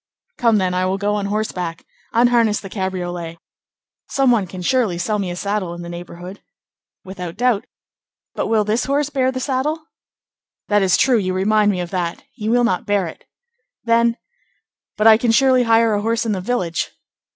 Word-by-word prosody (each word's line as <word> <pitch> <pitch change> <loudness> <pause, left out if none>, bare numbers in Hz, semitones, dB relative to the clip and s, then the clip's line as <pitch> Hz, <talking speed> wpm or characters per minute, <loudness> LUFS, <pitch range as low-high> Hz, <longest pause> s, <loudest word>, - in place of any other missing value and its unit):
"Come 230 -3 +4
then, 185 -2 0
I 185 0 +1
will 190 +1 0
go 205 +1 0
on 205 -1 -1
horseback. 180 -5 -3 0.3
Unharness 235 -2 +3
the 195 - -10
cabriolet. 175 -4 -4 0.7
Some 270 -2 +3
one 215 -6 +2
can 180 +1 -8
surely 225 -5 +1
sell 210 +5 -1
me 190 -3 -2
a 175 - -4
saddle 195 -2 -2
in 175 - -8
the 170 - -7
neighborhood." 175 +2 -9 0.6
"Without 180 -2 -7
doubt. 245 -3 +1 0.7
But - - -2
will 220 -1 +2
this 215 +3 0
horse 285 +2 0
bear 260 -2 +1
the 255 - -4
saddle?" 285 +4 -1 0.9
"That 205 0 +3
is 190 -2 +3
true; 245 -1 +3
you 185 -2 -2
remind 210 +2 +3
me 185 -3 0
of 175 - -6
that; 175 -3 -3
he 215 -4 -4
will 245 +1 +3
not 185 -6 0
bear 205 -2 +1
it." 165 - -10 0.6
"Then—" 230 0 +2 0.8
"But 215 - 0
I 220 -1 +8
can 235 - 0
surely 255 +1 +4
hire 225 -1 +4
a 205 - 0
horse 230 +2 0
in 225 - 0
the 190 -3 -2
village?" 180 -7 -1
210 Hz, 185 wpm, -20 LUFS, 185-235 Hz, 0.9 s, I